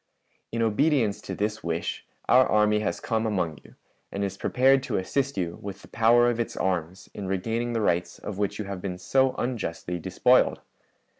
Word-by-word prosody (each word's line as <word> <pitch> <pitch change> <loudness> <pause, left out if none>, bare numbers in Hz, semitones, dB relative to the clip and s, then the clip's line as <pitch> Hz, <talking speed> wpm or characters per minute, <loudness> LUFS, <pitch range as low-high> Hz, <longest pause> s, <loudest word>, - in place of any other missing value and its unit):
"In 115 0 0
obedience 115 -1 +2
to - - -6
this 105 +1 -2
wish, 85 0 -3 0.2
our 130 +1 +6
army 105 0 +3
has 105 - -2
come 115 0 -1
among 90 -8 -1
you, - - -18 0.4
and 100 - -2
is 95 -1 -2
prepared 135 +6 +3
to - - -2
assist 140 +8 -1
yon 85 -2 -3
with 100 -1 -7
the - - -13
power 120 +2 +4
of 120 -1 0
its 115 - -3
arms 90 -1 -2
in 100 -2 -6
regaining 115 +6 -1
the 115 - 0
rights 85 -3 0
of 100 -1 -7
which 100 -1 -1
you 105 - -4
have 100 -2 -6
been 90 -2 -4
so 130 +7 +2
unjustly 90 -8 -3
despoiled. - - +3
105 Hz, 190 wpm, -26 LUFS, 95-120 Hz, 0.4 s, our